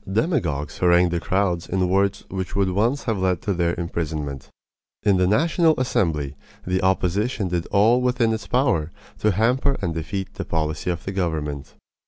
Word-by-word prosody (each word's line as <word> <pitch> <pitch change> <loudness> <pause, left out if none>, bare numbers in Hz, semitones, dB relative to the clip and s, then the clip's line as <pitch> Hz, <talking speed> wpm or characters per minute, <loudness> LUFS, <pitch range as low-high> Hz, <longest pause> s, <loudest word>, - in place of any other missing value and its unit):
Demagogues 95 - -1
harangued 90 0 +4
the 85 - 0
crowds 90 -1 -1
in 90 0 +1
words 100 +2 +1
which 95 +1 -5
would 100 -2 +2
once 115 +9 +1
have 110 -4 -1
led 95 -2 +1
to 100 - 0
their 85 -1 0
imprisonment. 75 -5 -4 0.5
In 100 -2 +4
the 90 0 +3
National 160 - +3
Assembly 80 - 0 0.3
the 90 +1 0
opposition 95 +3 0
did 85 -1 -2
all 110 +5 +4
within 125 -2 +2
its 110 -4 -5
power 120 - +1 0.3
to 105 - +2
hamper 125 +7 +2
and 85 -4 -2
defeat 95 +4 -4
the - - -5
policy 80 +1 -2
of 85 -2 -3
the 95 - -3
government. 75 -7 -3
95 Hz, 170 wpm, -23 LUFS, 85-110 Hz, 0.5 s, harangued